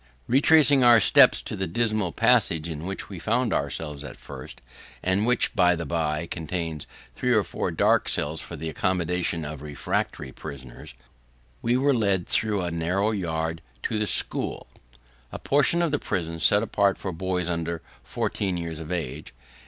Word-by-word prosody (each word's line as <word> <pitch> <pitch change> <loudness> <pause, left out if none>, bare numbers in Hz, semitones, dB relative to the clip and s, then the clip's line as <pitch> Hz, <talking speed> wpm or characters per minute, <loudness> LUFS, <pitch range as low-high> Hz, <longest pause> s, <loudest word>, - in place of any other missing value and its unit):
(2) - - -5
Retracing 145 -1 +5
our 120 -1 +8
steps - - +5
to - - -4
the 95 -1 -3
dismal 110 0 0
passage 80 +1 +3
in 80 +1 -6
which 95 - -4
we 95 -4 -8
found 115 +6 0
ourselves 75 0 -3
at 70 -3 -9
first 65 -2 -10 0.4
(and 95 +4 +1
which, 125 0 +1
by 90 -2 +4
the 85 0 -5
bye, 80 0 -1
contains 80 -2 -5 0.3
three - - -1
or - - +4
four - - -3
dark - - +2
cells 75 +2 -1
for - - -8
the 80 - -6
accommodation 85 0 -1
of 75 -1 -7
refractory 70 -2 -3
prisoners), 65 -4 -10 0.7
we 120 +1 +1
were 140 +2 +3
led 100 -7 +1
through 105 -3 +1
a 85 - -3
narrow 90 +6 0
yard 80 -4 -3 0.2
to 110 - -1
the 105 - +1
'school' - - +1 0.7
a - - -5
portion 145 +5 +2
of 165 - 0
the 145 - 0
prison 80 -2 -3
set 105 +5 +4
apart 100 -1 +1
for 95 - -4
boys 90 0 -2
under 85 -1 -3 0.2
fourteen 95 -3 -2
years 85 -2 -5
of 80 +1 -8
age. 75 -8 -5
90 Hz, 170 wpm, -25 LUFS, 80-105 Hz, 0.7 s, our